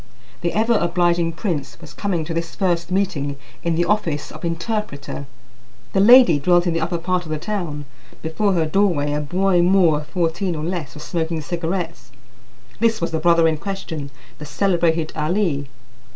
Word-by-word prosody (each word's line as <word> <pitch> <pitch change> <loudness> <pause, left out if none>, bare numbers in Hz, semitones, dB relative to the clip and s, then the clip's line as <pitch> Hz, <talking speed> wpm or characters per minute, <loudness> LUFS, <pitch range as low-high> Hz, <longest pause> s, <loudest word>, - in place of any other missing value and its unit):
The 170 - 0
ever 225 +2 +2
obliging 170 -1 +1
prince 145 - -3
was - - -12
coming 180 -6 -2
to 165 - -4
this 165 0 -3
first 175 -3 0
meeting 170 -8 -1 0.2
in 170 -1 0
the 175 +1 +2
office 170 -6 -1
of - - -11
interpreter. 165 -5 -3 0.7
The - - +2
lady 225 - +7
dwelt 175 +4 +3
in 175 - +1
the 165 - -1
upper 170 +2 -1
part 180 +2 -1
of - - -9
the 155 - -1
town. 160 -5 -4 0.4
Before 190 +6 0
her 165 -3 +2
doorway 155 -4 +1
a 150 - -1
boy 180 +4 +2
Moor 175 -4 +4
of 150 - -10
fourteen 175 +1 -1
or 155 - -4
less 160 -6 -4
was 150 - -8
smoking 165 -1 -2
cigarettes; 170 -3 -4 0.7
this 225 0 +2
was 170 - -2
the 160 - -1
brother 170 0 +4
in 160 -1 +1
question, 165 -5 -5 0.3
the 150 - -7
celebrated 165 0 +1
Ali. 155 -3 0
170 Hz, 175 wpm, -21 LUFS, 155-185 Hz, 0.7 s, lady